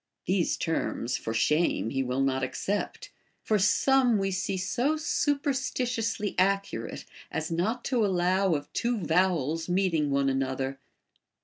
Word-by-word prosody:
These 185 -2 +1
terms, 130 -6 -1
for 115 - -4
shame, 150 0 +1
he 135 - 0
will 130 +1 -1
not 135 -1 +1
accept; 195 +10 -3 0.3
for 215 -1 +2
some 245 +3 +4
we 195 -1 0
see 190 +1 -2
so 250 +11 0
superstitiously 260 - -1
accurate 195 -11 0 0.2
as 160 +1 -3
not 215 +9 -1
to 245 -4 +1
allow 185 -1 +2
of 145 0 -6
two 240 0 0
vow 180 -1 +2
els 160 +4 -3
meeting 175 -5 +1
one 140 0 +1
another. 135 0 -1
185 Hz, 135 wpm, -28 LUFS, 145-225 Hz, 0.3 s, some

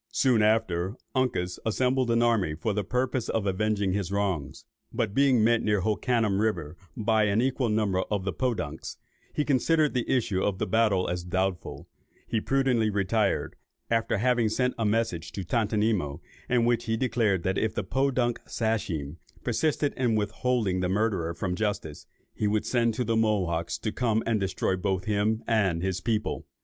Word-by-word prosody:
Soon 125 -5 +3
after, 105 -3 +1 0.2
Uncas 115 -9 -1
assembled 125 +3 +1
an 115 0 +3
army 105 -10 +2
for 100 +7 -2
the 105 0 -1
purpose 125 +2 -1
of 110 -3 0
avenging 100 0 0
his 100 -2 -2
wrongs; 95 -9 -2 0.3
but 110 -3 -1
being 135 -3 +4
met 115 0 +3
near 105 -2 +1
Hoccanum 110 0 +1
river 90 -8 -1 0.2
by 110 0 +2
an 105 +1 +2
equal 130 -1 +1
number 105 -3 +1
of 100 -3 -1
the 95 - -1
Podunks, 90 - -3 0.4
and 150 - +1
considering 150 +3 +2
the 125 -3 -1
issue 110 -7 +1
of 100 -2 -1
a - - 0
battle 110 -5 +2
as 90 0 -2
doubtful, 95 0 -2 0.4
he 110 - -1
prudently 130 -5 +2
retired, 100 +1 0 0.4
after 115 -1 +1
having 120 0 +2
sent 125 +3 0
a 115 - +1
message 105 -7 0
to 95 - -4
Tontonimo, 105 -6 0 0.3
in 120 -2 +3
which 120 -1 +1
he 115 0 0
declared, 115 -7 +1
that 95 +1 0
if 110 - -1
the 105 - -1
Podunk 130 +1 0
Sachem 90 - -2 0.3
persisted 150 -2 0
in 120 -4 +1
withholding 105 -2 0
the 90 0 0
murderer 95 -5 0
from 90 0 -2
justice, 95 -7 -3 0.3
he 105 - -1
would 105 +1 0
send 115 -3 +1
to 125 - 0
the 115 -1 0
Mohawks 95 -7 0
to 110 - -3
come 115 -2 0
and 115 -2 +1
destroy 95 -1 0
both 95 0 -1
him 110 +1 0
and 95 -7 +1
his 95 -1 -1
people. 110 +1 -2
110 Hz, 170 wpm, -27 LUFS, 95-115 Hz, 0.4 s, being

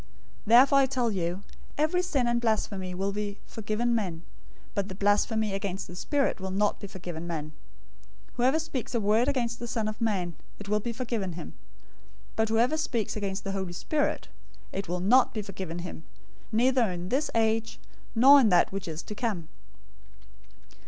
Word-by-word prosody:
012:031 - - -24 0.4
Therefore 255 +5 +7
I 270 - +5
tell 250 -3 0
you, 180 0 -2 0.3
every 315 +4 +2
sin 285 -8 0
and 235 0 +1
blasphemy 200 -5 -1
will 195 +2 -1
be 205 0 -4
forgiven 225 +2 -1
men, 180 -8 -2 0.5
but 200 -1 -1
the 190 - -6
blasphemy 205 +1 +2
against 195 -1 -3
the 175 - -10
Spirit 280 +7 0
will 190 0 -4
not 205 +2 +1
be 200 - -7
forgiven 175 -3 -7
men. 155 -3 -4 0.8
012:032 - - -30
Whoever 255 +5 +3
speaks 275 -7 -4
a - - +3
word 220 +4 +3
against 240 -4 0
the 240 - -5
Son 225 -2 -1
of 215 +1 -5
Man, 190 -6 0 0.2
it 205 - -9
will 210 +1 +2
be 235 +3 -3
forgiven 230 -6 -3
him; 165 -1 -8 0.8
but 220 0 +1
whoever 240 +7 +3
speaks 235 -9 -1
against 195 -2 -3
the 195 - -3
Holy 190 -3 -3
Spirit, 295 - -1 0.4
it 195 0 -4
will 175 +1 -2
not 245 +8 +4
be 215 - -2
forgiven 190 -4 -6
him, 160 - -8 0.5
neither 245 0 +3
in 180 0 -5
this 280 +4 +1
age, 225 - +1 0.4
nor 270 +5 +8
in 225 - +4
that 180 - +4
which 195 -2 -4
is 160 0 -5
to - - -6
come. 205 -8 -3
210 Hz, 180 wpm, -28 LUFS, 190-240 Hz, 0.8 s, nor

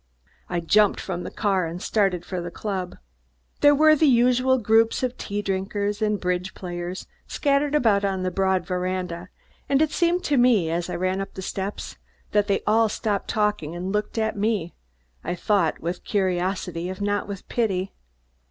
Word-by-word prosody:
I 175 -1 -1
jumped 210 +5 +3
from 180 -2 -4
the - - -5
car 195 -5 0
and 170 +2 -6
started 190 -4 0
for 185 -2 -4
the 175 - -5
club. 185 -1 -4 0.6
There 290 0 +6
were 310 +1 +6
the 310 +1 +3
usual 255 +1 +4
groups 225 +1 +3
of 255 -1 -1
tea 205 0 -4
drinkers 200 +2 -2
and 210 -1 +1
bridge 180 0 -2
players 175 0 -5 0.2
scattered 285 0 +1
about 220 -8 +3
on 190 -2 -1
the 185 - -1
broad 190 -1 +1
veranda, 180 -1 -3 0.4
and 275 -1 +3
it 315 0 +2
seemed 350 +1 +1
to 290 - +1
me, 230 -10 +4
as 170 +1 -2
I - - -3
ran 185 +2 -1
up 195 - -7
the 190 - -6
steps, 195 +2 -5 0.3
that 205 -1 +2
they 200 - +1
all 220 +1 +3
stopped 205 -1 -2
talking 210 -7 -1
and 180 +2 -4
looked 210 +2 -2
at 220 0 0
me, 205 -5 -1 0.5
I 175 - -2
thought, 175 -2 +1
with 175 +2 -4
curiosity, 180 -2 -1
if 185 - -6
not 205 0 -1
with 200 -2 -7
pity. 195 -5 -1
200 Hz, 180 wpm, -24 LUFS, 180-220 Hz, 0.6 s, There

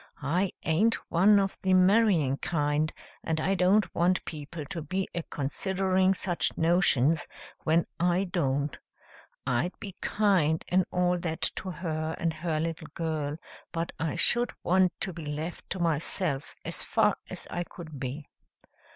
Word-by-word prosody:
I 175 +7 +1
aint 210 +9 +3 0.2
one 200 +5 +6
of 195 -1 -1
the 190 -1 +3
marrying 185 -7 +4
kind, 150 -1 0 0.3
and 160 -1 -1
I 190 +5 +1
don't 195 +3 +3
want 175 +1 +2
people 155 0 -6
to 165 +4 -5
be 185 +4 -2
a 170 - -2
considering 190 +6 0
such 175 -2 0
notions 165 -3 +3 0.4
when 165 +1 +3
I 175 +2 +2
don't. 145 -6 -1 0.7
I'd 125 +9 -1
be 195 -2 -7
kind 185 -7 +2
and 185 0 +3
all 180 0 +1
that 165 -1 -3 0.2
to 190 - -4
her 160 -3 -3
and 165 -1 0
her 160 -1 -2
little 165 0 -3
girl, 155 -3 -2 0.3
but 165 0 -2
I 160 0 -1
should 240 +7 +2
want 185 0 +4
to 190 - 0
be 165 -1 -7
left 150 +3 -5
to 190 - -3
myself 160 -2 +1
as - - -3
far - - +2
as - - -8
I 175 - -1
could 160 -5 -10
be." 135 +3 -5
170 Hz, 150 wpm, -28 LUFS, 155-185 Hz, 0.7 s, one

